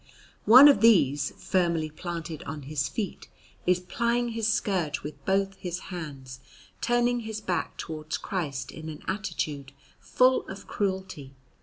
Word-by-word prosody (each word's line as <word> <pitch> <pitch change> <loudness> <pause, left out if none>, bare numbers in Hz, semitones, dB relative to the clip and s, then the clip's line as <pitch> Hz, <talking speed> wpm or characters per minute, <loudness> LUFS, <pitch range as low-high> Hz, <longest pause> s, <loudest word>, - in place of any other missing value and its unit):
One 255 +6 +11
of 285 - +5
these, 145 - +4
firmly 170 -4 0
planted 165 -1 -6
on 150 0 -6
his 145 +1 -2
feet, 205 -6 -5 0.4
is 180 0 +4
plying 235 +6 0
his 225 -1 0
scourge 175 -8 -1
with 150 - -8
both 195 0 +1
his 180 -2 -4 0.2
hands, 135 -7 -7 0.4
turning 240 0 +2
his 220 -2 -5
back 185 -4 -3
towards 155 -1 -5
Christ 140 -8 -4
in 160 0 -8
an 150 - -9
attitude 155 -8 -3 0.3
full 255 +1 +3
of 195 +1 -8
cruelty. 190 -9 -3
180 Hz, 140 wpm, -27 LUFS, 150-215 Hz, 0.4 s, One